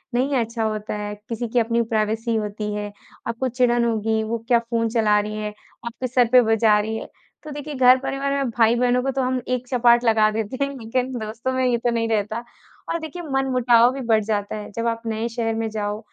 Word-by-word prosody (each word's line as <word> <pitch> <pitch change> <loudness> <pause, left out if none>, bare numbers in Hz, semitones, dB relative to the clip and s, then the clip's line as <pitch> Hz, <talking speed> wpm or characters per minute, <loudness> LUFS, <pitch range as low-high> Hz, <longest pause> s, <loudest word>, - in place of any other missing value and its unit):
नहीं 270 +3 +1
अच्छा 230 -1 -1
होता 215 -1 -2
है, 210 0 -4 0.2
किसी 235 +1 -3
की 245 - +2
अपनी 230 0 +1
प्राइवेसी 220 +2 0
होती 210 0 -3
है, 205 0 -4 0.4
आपको 235 +3 -2
चिड़न 240 -1 +2
होगी, 220 -1 0
वो 225 +2 -2
क्या 240 -2 +4
फ़ोन 230 -1 -1
चला 215 -3 +3
रही 210 +1 -4
है, 210 -1 -4 0.3
आपके 235 +2 -4
सर 245 -1 +3
पे 250 - +8
बजा 220 -2 +3
रही 220 +1 -2
है। - - -7 0.4
तो 305 - -8
देखिए 295 0 -6
घर 255 -1 +6
परिवार 275 +1 -2
में 275 -3 0
भाई-बहनों 245 +2 +3
को 270 - 0
तो 270 0 -1
हम 255 0 0
एक 250 0 -2
चपाट 240 -1 +4
लगा 220 -2 +4
देते 225 +5 -2
हैं, - - -5
लेकिन 250 +2 -2
दोस्तों 225 +4 -4
में 260 0 +1
ये 245 -1 +2
तो 240 +1 -1
नहीं 230 -1 0
रहता, 215 +1 -1 0.5
और 335 - -1
देखिए 320 +2 -7
मनमुटाव 250 -3 +4
भी 270 - -5
बढ़ 220 -2 +3
जाता 205 -1 -2
है। 210 -1 -7
जब 230 +3 -2
आप 230 0 -1
नए 225 +1 -2
शहर 225 -1 -2
में 225 0 -2
जाओ, 210 -1 -3
230 Hz, 220 wpm, -22 LUFS, 220-250 Hz, 0.5 s, पे